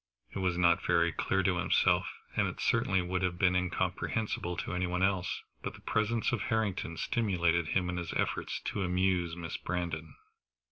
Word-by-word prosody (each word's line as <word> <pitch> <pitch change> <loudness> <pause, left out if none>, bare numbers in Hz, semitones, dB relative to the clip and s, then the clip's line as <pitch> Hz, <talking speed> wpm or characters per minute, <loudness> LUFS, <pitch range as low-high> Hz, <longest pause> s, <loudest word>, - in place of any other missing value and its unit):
It - - -5
was 90 -2 0
not 85 -1 +4
very 85 -1 +3
clear 95 +4 0
to 95 -2 +2
himself, 90 - +3 0.3
and - - +2
it - - -6
certainly 95 -1 +2
would 90 +1 -1
have 90 -1 0
been 90 0 +3
incomprehensible 90 0 -1
to - - -3
any 90 0 0
one 90 +1 0
else, 95 -2 0 0.2
but - - -5
the - - -14
presence 110 +1 0
of 120 - -1
Harrington 100 -7 -1
stimulated 85 -8 +1
him 90 +1 +1
in 90 0 -2
his 85 -1 -4
efforts - - -1
to 105 - -3
amuse 90 -2 +1
Miss 85 -2 -5
Brandon. 85 -3 -4
90 Hz, 180 wpm, -31 LUFS, 85-95 Hz, 0.3 s, not